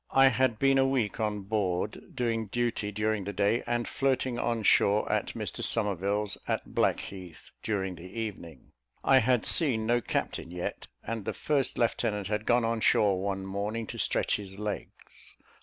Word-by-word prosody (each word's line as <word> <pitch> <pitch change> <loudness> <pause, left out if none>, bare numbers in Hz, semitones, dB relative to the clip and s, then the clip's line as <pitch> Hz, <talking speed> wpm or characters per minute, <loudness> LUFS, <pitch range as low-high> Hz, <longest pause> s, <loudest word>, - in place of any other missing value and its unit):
I 135 0 +6
had 130 -3 +1
been 135 +2 +3
a 135 - +4
week 125 -5 0
on 105 -2 -1
board, 100 -1 -2
doing 115 -3 -1
duty 115 -1 -1
during 105 0 -1
the 100 - -4
day 105 +4 +2
and 120 0 -1
flirting 130 -2 0
on 115 -2 -1
shore, 105 +1 +4
at - - -1
Mr - - -4
Somerville's, 105 -1 +1
at - - -3
Blackheath, 90 -4 -2
during 95 -4 -2
the 90 +1 -11
evening. 100 -7 -7 0.3
I 135 -1 +6
had 125 -1 +2
seen 125 -10 +4
no 120 +1 +2
captain 85 - -3
yet, 90 0 -5 0.2
and 115 -2 -4
the - - -3
first 145 -3 -1
lieutenant 105 -4 0
had 105 0 -2
gone 120 -1 +3
on 115 0 0
shore 100 -3 +3
one 95 -1 -2
morning 105 +4 -3
to - - -7
stretch - - +1
his 95 -2 -9
legs. 105 -1 -7
110 Hz, 170 wpm, -29 LUFS, 100-120 Hz, 0.3 s, I